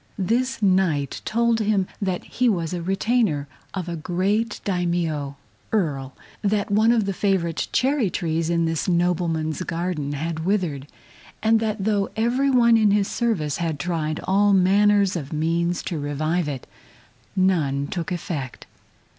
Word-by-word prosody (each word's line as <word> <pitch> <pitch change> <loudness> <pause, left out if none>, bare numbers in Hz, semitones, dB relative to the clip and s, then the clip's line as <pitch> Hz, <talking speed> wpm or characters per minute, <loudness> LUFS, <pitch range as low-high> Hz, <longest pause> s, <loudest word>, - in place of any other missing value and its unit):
This 235 +5 0
Knight 185 -8 +1
told 235 0 +2
him 205 -3 +1 0.2
that 185 -3 -1
he 250 -1 0
was 170 -5 -1
a 175 - -3
retainer 195 -4 0 0.3
of 185 -2 -3
a 170 - -3
great 195 +7 -1
Daimio 170 -6 -1 0.4
(Earl); 140 -10 -1 0.3
that 205 -1 0
one 220 +3 +4
of 225 -3 +2
the 195 - -1
favorite 185 -4 0
cherry 255 -3 +2
trees 165 -1 -1
in 170 -1 +2
this 165 +2 -1
nobleman's 170 -2 0
garden 165 -4 -2
had 160 +2 -3
withered, 170 -8 -1 0.6
and 225 0 +4
that 215 -2 -2
though 205 -2 +1
every 245 +5 +1
one 235 -3 +5
in 215 -2 +4
his 200 -1 +2
service 175 - -1
had 165 -3 -2
tried 155 0 -2
all 200 +1 +3
manner 200 +2 +4
of 170 -7 -3
means 170 +3 0
to 165 - -3
revive 155 +4 -1
it, 135 -4 -5 0.7
none 155 -8 +1
took 170 +3 -4
effect. 155 -7 -4
180 Hz, 145 wpm, -23 LUFS, 160-210 Hz, 0.7 s, one